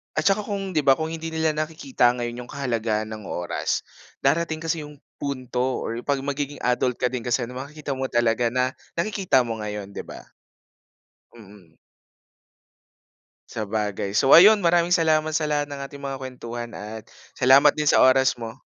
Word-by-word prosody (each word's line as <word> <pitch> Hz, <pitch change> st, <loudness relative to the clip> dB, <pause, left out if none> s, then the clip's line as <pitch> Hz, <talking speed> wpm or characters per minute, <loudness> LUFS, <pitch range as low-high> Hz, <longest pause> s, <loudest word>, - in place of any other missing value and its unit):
At 155 Hz, +5 st, +3 dB
saka 200 Hz, +1 st, +1 dB
kung, 195 Hz, -4 st, -4 dB
'di 150 Hz, -, +2 dB
ba, 135 Hz, -, +7 dB
kung 160 Hz, +3 st, -1 dB
hindi 165 Hz, 0 st, -5 dB
nila 160 Hz, -1 st, 0 dB
nakikita 155 Hz, -, +1 dB
ngayon 120 Hz, 0 st, -5 dB
'yong -, -, -14 dB
kahalagahan 115 Hz, -5 st, -1 dB
ng 110 Hz, -2 st, -8 dB
oras, 85 Hz, -1 st, -2 dB, 0.4 s
darating 160 Hz, +3 st, +1 dB
kasi 165 Hz, -2 st, -2 dB
'yong 150 Hz, -1 st, -13 dB, 0.2 s
punto 130 Hz, -2 st, -2 dB
or 115 Hz, -, -4 dB
'pag 140 Hz, -2 st, 0 dB
magiging 145 Hz, +1 st, -4 dB
adult 125 Hz, 0 st, 0 dB
ka 125 Hz, -, +2 dB
din 125 Hz, -2 st, -5 dB
kasi, 120 Hz, 0 st, 0 dB
makikita 140 Hz, +2 st, -6 dB
mo 130 Hz, -, -3 dB
talaga 120 Hz, 0 st, +2 dB
na, 130 Hz, 0 st, 0 dB, 0.2 s
nakikita 185 Hz, -6 st, +1 dB
mo 115 Hz, -2 st, -2 dB
ngayon, 105 Hz, -1 st, -5 dB
'di 100 Hz, -, -7 dB
ba? -, -, -10 dB, 1.2 s
Mm. 100 Hz, -6 st, -17 dB, 1.7 s
Sabagay. 105 Hz, -2 st, -3 dB
So 135 Hz, +5 st, +3 dB
ayun, 205 Hz, +3 st, +8 dB
maraming 175 Hz, +1 st, +3 dB
salamat 155 Hz, -1 st, +2 dB
sa 155 Hz, -2 st, 0 dB
lahat 145 Hz, -1 st, 0 dB
ng 140 Hz, -1 st, -7 dB
ating 140 Hz, +1 st, -8 dB
mga 135 Hz, -1 st, -4 dB
kuwentuhan 120 Hz, -2 st, -6 dB
at 105 Hz, +1 st, -7 dB, 0.3 s
salamat 135 Hz, +3 st, +6 dB
din 150 Hz, -1 st, 0 dB
sa -, -, +4 dB
oras 130 Hz, -1 st, +3 dB
mo. 115 Hz, +2 st, -8 dB
135 Hz, 165 wpm, -24 LUFS, 120-155 Hz, 1.7 s, ayun